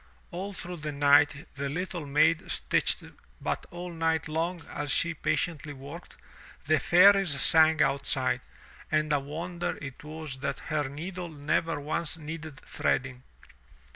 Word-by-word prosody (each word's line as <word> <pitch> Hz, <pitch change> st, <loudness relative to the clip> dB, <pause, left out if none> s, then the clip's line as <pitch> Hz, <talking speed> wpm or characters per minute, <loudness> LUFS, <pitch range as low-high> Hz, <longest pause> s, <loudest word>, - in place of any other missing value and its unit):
All 190 Hz, +3 st, -4 dB
through 180 Hz, -2 st, -6 dB
the 150 Hz, -1 st, -4 dB
night 145 Hz, +1 st, +4 dB
the 140 Hz, 0 st, -3 dB
little 170 Hz, 0 st, -4 dB
maid 155 Hz, +3 st, +3 dB
stitched, -, -, +1 dB, 0.4 s
but -, -, -3 dB
all 175 Hz, 0 st, -7 dB
night 160 Hz, -1 st, 0 dB
long 165 Hz, +1 st, -2 dB
as 145 Hz, 0 st, -4 dB
she 170 Hz, +4 st, +1 dB
patiently 155 Hz, -1 st, -2 dB
worked, 145 Hz, +6 st, -10 dB, 0.5 s
the 155 Hz, 0 st, +3 dB
fairies 180 Hz, -1 st, +5 dB
sang 160 Hz, +2 st, +5 dB
outside, 135 Hz, -1 st, +2 dB, 0.5 s
and 155 Hz, -1 st, +2 dB
a 145 Hz, -, +3 dB
wonder 170 Hz, +5 st, -4 dB
it 135 Hz, -2 st, -8 dB
was 155 Hz, -3 st, -7 dB
that 140 Hz, 0 st, -2 dB
her 150 Hz, -3 st, -2 dB
needle 175 Hz, +5 st, -6 dB
never 155 Hz, +1 st, -1 dB
once 155 Hz, +2 st, -2 dB
needed 155 Hz, -2 st, -7 dB
threading. 130 Hz, -1 st, -1 dB
155 Hz, 140 wpm, -29 LUFS, 145-170 Hz, 0.5 s, fairies